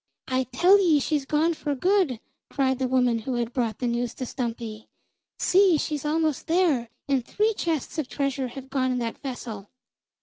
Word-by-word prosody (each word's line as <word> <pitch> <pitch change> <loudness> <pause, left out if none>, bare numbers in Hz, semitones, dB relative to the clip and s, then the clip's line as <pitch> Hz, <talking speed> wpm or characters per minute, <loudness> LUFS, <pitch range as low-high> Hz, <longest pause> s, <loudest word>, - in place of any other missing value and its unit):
"I 260 0 0
tell 350 - +5
ye 325 -6 +4
she's 290 0 -1
gone 315 +3 +2
for 295 -2 -3
good!" 360 - +2 0.3
cried 265 -2 0
the 260 - +1
woman 250 -2 +2
who 245 +3 -3
had 235 0 -2
brought 235 -4 -1
the 250 - -3
news 240 0 -1
to 255 - -4
Stumpy. 230 -3 -5 0.5
"See, 375 -3 +4
she's 300 -1 -3
almost 310 -1 0
there, 320 -9 +2 0.2
and 270 -3 +1
three 430 - +1
chests 325 - -2
of 295 - -2
treasure 275 -2 -1
have 265 +2 -10
gone 260 -2 +1
in 250 - 0
that 230 -2 -3
vessel! 230 -7 -6
265 Hz, 180 wpm, -25 LUFS, 245-310 Hz, 0.5 s, tell